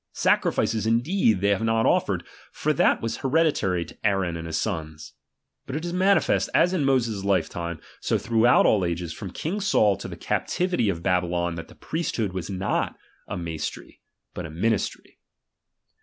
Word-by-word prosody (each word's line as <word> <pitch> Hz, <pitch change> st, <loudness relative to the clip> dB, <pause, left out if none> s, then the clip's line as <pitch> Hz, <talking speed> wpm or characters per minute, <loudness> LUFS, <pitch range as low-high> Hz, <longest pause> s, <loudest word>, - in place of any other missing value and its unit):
Sacrifices 110 Hz, -1 st, +1 dB
in 115 Hz, +1 st, +3 dB
deed 125 Hz, -, +2 dB
they 100 Hz, -, +2 dB
have 100 Hz, 0 st, +2 dB
not 115 Hz, 0 st, +2 dB
offered; -, -, +1 dB, 0.3 s
for -, -, 0 dB
that -, -, +2 dB
was 115 Hz, -, -2 dB
hereditary 130 Hz, -, +1 dB
to -, -, -13 dB
Aaron 95 Hz, -5 st, +1 dB
and 80 Hz, 0 st, -6 dB
his 80 Hz, -, -2 dB
sons. 80 Hz, -6 st, -4 dB, 0.5 s
But 135 Hz, -, -4 dB
it 160 Hz, +3 st, -3 dB
is 175 Hz, -, -3 dB
manifest, 190 Hz, +2 st, +3 dB
as 180 Hz, +2 st, +4 dB
in 160 Hz, -7 st, +1 dB
Moses' 115 Hz, -7 st, +1 dB
lifetime, 85 Hz, -4 st, -1 dB, 0.2 s
so -, -, 0 dB
throughout 115 Hz, +2 st, +4 dB
all 100 Hz, -3 st, +4 dB
ages, 85 Hz, -1 st, -2 dB
from 100 Hz, -, -7 dB
king 170 Hz, -, -3 dB
Saul 110 Hz, -, +3 dB
to -, -, -7 dB
the -, -, -7 dB
captivity 180 Hz, -, 0 dB
of 85 Hz, -3 st, -3 dB
Babylon, 90 Hz, -2 st, 0 dB
that 80 Hz, -1 st, -7 dB
the -, -, -16 dB
priest 165 Hz, +2 st, -3 dB
hood 105 Hz, -5 st, -1 dB
was 95 Hz, 0 st, -4 dB
not 95 Hz, 0 st, -1 dB, 0.3 s
a -, -, -4 dB
maistry, 80 Hz, -3 st, -6 dB, 0.3 s
but 90 Hz, -, -5 dB
a -, -, -10 dB
ministry. 100 Hz, +7 st, -2 dB
100 Hz, 175 wpm, -25 LUFS, 85-125 Hz, 0.5 s, as